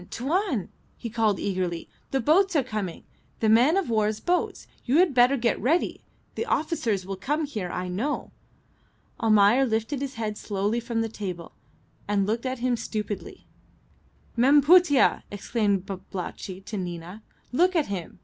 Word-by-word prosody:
Tuan!" 285 - -1 0.3
he 230 - -6
called, 220 -3 +1
eagerly. 180 -3 -2 0.2
"The 270 - 0
boats 345 - +3
are 285 - +4
coming. 215 -8 -4 0.4
The 220 - +2
man 250 - +5
of 390 - 0
war's 215 -1 +1
boats. 355 0 -1 0.2
You 260 +4 +2
had 350 -4 +4
better 250 +2 +5
get 235 -1 0
ready. 320 +8 +1 0.3
The 465 - -3
officers 235 - 0
will 195 +1 -4
come 300 +9 -1
here, 215 -11 -4
I 180 +1 -3
know." 220 +12 -3 0.9
Almayer 215 +3 +5
lifted 230 +3 -1
his 275 -1 -4
head 215 -2 -3
slowly 205 +3 -1
from 235 -1 -2
the 225 - -1
table, 185 -6 -6 0.6
and 200 -1 +1
looked 225 +5 -1
at 260 0 -2
him 245 0 0
stupidly. 215 - -5 0.9
"Mem 275 +5 +5
Putih!" 325 -3 +5
exclaimed 205 -2 -1
Babalatchi 190 0 -6
to 215 - -5
Nina, 175 +2 -6 0.3
"look 360 +8 +3
at 315 -4 +3
him. 190 -4 -6
225 Hz, 155 wpm, -26 LUFS, 200-280 Hz, 0.9 s, man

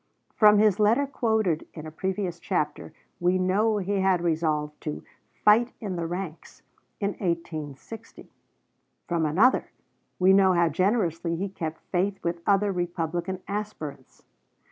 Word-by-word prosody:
From 210 -1 +6
his 210 -2 +4
letter 225 +7 +4
quoted 220 - 0
in 155 -2 -8
a 155 - -7
previous 185 +1 -3
chapter 155 -4 -2 0.3
we 180 +1 +2
know 205 +4 +2
he 200 0 -1
had 190 -1 +3
resolved 155 -3 -1
to 150 - -5 0.4
"fight 230 +4 +5
in 200 -5 -4
the 170 -1 -3
ranks" 175 -2 -7 0.4
in 200 - 0
1860. 170 +3 -5 0.8
From 165 -2 0
another, 205 - +3 0.5
we 185 +1 +5
know 190 -1 +5
how 170 -1 +3
generously 175 -4 0
he 195 +4 -3
kept 165 -4 -5
faith 195 +2 0
with 170 0 -2
other 200 0 +3
Republican 175 0 -3
aspirants. 195 -10 -6
185 Hz, 135 wpm, -26 LUFS, 165-205 Hz, 0.8 s, From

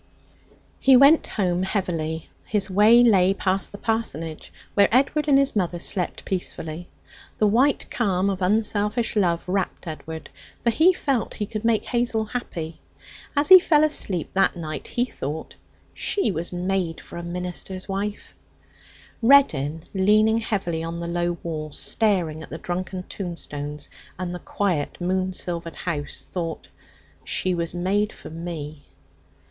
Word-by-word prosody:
He 265 -1 +7
went 280 +5 +6
home 180 -3 0
heavily. 165 -5 -2 0.2
His 200 -2 0
way 215 +5 +6
lay 195 -5 +5
past 190 0 0
the 200 - -8
parsonage 165 -9 -3 0.2
where 200 -1 +5
Edward 275 +5 +2
and 280 -2 +6
his 275 -3 +2
mother 180 -3 0
slept 180 +1 -2
peacefully. 175 -2 -4 0.5
The 215 - +3
white 250 +7 +3
calm 195 -5 +1
of 195 -1 -1
unselfish 210 +3 +1
love 175 -5 +2
wrapped 190 0 -2
Edward, 160 0 -7 0.3
for 235 - +3
he 320 +11 +5
felt 275 -9 -1
that - - -11
he 210 - -1
could 215 +1 -5
make 225 -2 +2
Hazel 235 -3 0
happy. 170 -9 -5 0.6
As 290 +1 +3
he 375 0 +12
fell 305 -4 +4
asleep 200 - 0
that 195 0 +3
night 155 -3 -5
he 245 - 0
thought: 150 - -6 0.4
'She 395 - 0
was 170 -1 -3
made 180 -2 -1
for - - -10
a 170 - -5
minister's 180 +2 -5
wife.' 200 +1 -4 0.9
Reddin, 165 - +4
leaning 215 +3 +4
heavily 190 -7 -2
on 165 +1 -4
the 170 - -4
low 175 0 -1
wall, 155 -2 -4
staring 175 -8 +1
at - - -10
the 160 - -6
drunken 180 +2 -4
tombstones 150 -6 -5 0.3
and 180 -1 -4
the 180 - -5
quiet 175 -9 -2
moon 185 +1 0
silvered 170 -2 -4
house, 150 -5 -4
thought: 165 -3 -4 0.5
'She 185 - 0
was 170 0 -2
made 200 +4 +1
for - - -11
me.' 155 -3 -6
185 Hz, 150 wpm, -24 LUFS, 170-215 Hz, 0.9 s, he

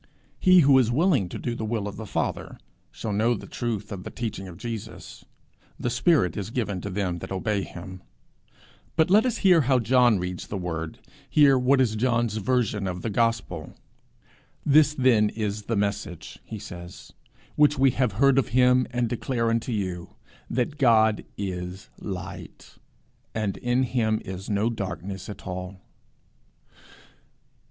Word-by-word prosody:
He 185 -1 +6
who 135 -2 +6
is 120 -3 +2
willing 140 - +2
to - - -6
do 120 - -3
the 115 - -5
will 110 -2 -2
of 100 - -6
the 110 - -7
Father - - -3 0.3
shall 105 - -5
know 115 +4 +2
the - - -8
truth 110 -3 -4
of 95 -2 -6
the - - -6
teaching 110 -5 -5
of 85 -2 -10
Jesus. 115 -1 -7 0.5
The 120 - -1
spirit 120 - +2
is 100 0 -4
'given 105 -6 -2
to 100 - -5
them 95 -3 -2
that - - -8
obey 100 +1 -1
him.' 95 0 -9 0.9
But 160 +1 +3
let 215 +5 +5
us 245 - -1
hear 180 -4 +7
how 130 -1 +3
John 120 -1 +4
reads 90 0 -4
the 100 - -4
Word 80 -3 -4 0.4
near 145 -3 +7
what 130 +2 +3
is 120 -4 +2
John's 120 -1 +1
version 110 -2 0
of 90 -1 -5
the 115 - -2
gospel. 115 -8 -1 0.9
'This 150 +1 +5
then 120 -6 +4
is 105 -1 -4
the 115 - -1
message,' 100 -4 -3
he 110 - -7
says, 90 -2 -10 0.4
'which 150 0 +4
we 135 0 +4
have 125 -4 0
heard 135 +5 +4
of 135 - 0
him, 125 0 +4
and 120 -1 0
declare 115 0 -1
unto 115 +2 -1
you, 95 -5 -4 0.3
that 130 +5 -2
God 110 -4 +4
is 90 -1 -5
light, 95 -2 -8 0.6
and 105 -3 -1
in 125 +1 +1
him 110 -4 0
is 95 -1 -7
no 105 +3 +1
darkness 95 -2 -5
at 100 - -9
all.' 90 +1 -6
110 Hz, 160 wpm, -25 LUFS, 95-125 Hz, 0.9 s, hear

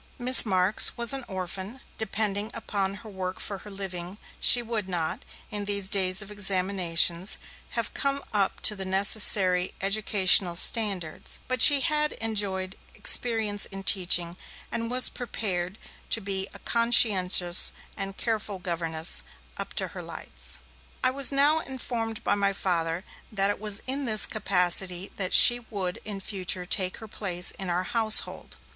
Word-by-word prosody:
Miss 250 -2 +8
Marks 190 +1 +2
was 235 +2 +1
an 270 -1 -4
orphan, 190 +5 -8 0.2
depending 210 -1 -2
upon 200 -3 -4
her - - -10
work 185 -1 -7
for 200 -2 -5
her 210 - -13
living; 190 -2 -6 0.2
she 245 - +6
would 220 -4 -5
not, 165 -3 -5 0.3
in 205 -1 -4
these 200 -1 0
days 190 -1 +1
of 210 - -13
examinations, 185 -3 0 0.4
have 230 -2 -2
come 275 0 -3
up 200 -2 -1
to 210 - +6
the 195 - -5
necessary 190 -1 +4
educational 195 -2 +1
standards, 185 -4 0
but 255 -2 -1
she 285 +2 +9
had 300 -1 -1
enjoyed 200 -4 -4 0.2
experience 220 -4 +1
in 195 -1 -10
teaching, 175 -3 +2 0.3
and 230 0 -5
was 250 +1 +4
prepared 195 -6 -6 0.3
to - - +1
be 195 -2 -5
a - - -13
conscientious 195 -7 +3 0.2
and 195 0 -7
careful 215 -3 -4
governess, 165 - -3 0.4
up - - -7
to - - -3
her - - -10
lights. 60 +1 -9 0.4
I - - +1
was 275 +1 +3
now 285 +3 +1
informed 235 -5 -7
by - - -1
my 200 -1 -2
Father 170 -2 -3 0.3
that 200 -1 0
it 205 - -8
was 210 -1 -2
in 275 +2 -4
this 215 -3 +4
capacity 180 0 0
that 185 -2 -3
she 240 0 +7
would 195 -6 -6
in 205 -2 -6
future 185 -2 -3
take 185 0 -1
her 220 - -12
place 180 -4 -2
in 190 -2 -8
our 175 +1 -2
household. 220 +2 +3
200 Hz, 150 wpm, -24 LUFS, 185-225 Hz, 0.4 s, she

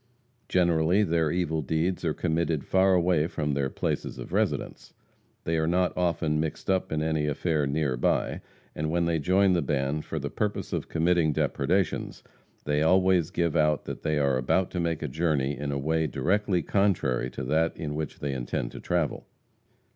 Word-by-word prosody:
Generally, 85 +2 +3
their 80 -4 +1
evil 80 -2 -1
deeds 80 +6 -1
are 80 -3 0
committed 80 -3 0
far 95 0 +3
away 85 -3 +2
from 75 -4 -2
their 70 -1 0
places - - -3
of - - -8
residence. - - -2 0.5
They 80 0 0
are 80 - 0
not 90 +1 +1
often 85 -4 0
mixed 80 +4 -2
up 95 -1 0
in 80 0 0
any 80 -1 0
affair 75 0 0
near 70 -2 0
by, - - 0 0.3
and 75 +1 -2
when 85 +1 +1
they 85 -1 +1
join 95 +4 +3
the 85 - +2
band 70 +1 -1
for 80 - -5
the 70 -1 -4
purpose 105 -1 -2
of - - -3
committing 85 -1 +2
depredations, 90 +7 -1 0.4
they 75 0 0
always 90 0 +3
give 85 -4 -1
out 75 -2 +2
that - - -6
they 75 -1 0
are 70 -3 +2
about 90 +8 +1
to 90 - -3
make 85 -2 -1
a - - -1
journey 75 -2 0
in 70 +2 -4
a 70 - -1
way 80 +3 0
directly 95 - 0
contrary 80 -11 +1
to 65 - -6
that 80 +5 +1
in 75 -2 -4
which 75 -1 -5
they 70 -1 -2
intend - - -3
to - - -9
travel. 85 -4 -2
80 Hz, 185 wpm, -27 LUFS, 75-90 Hz, 0.5 s, Generally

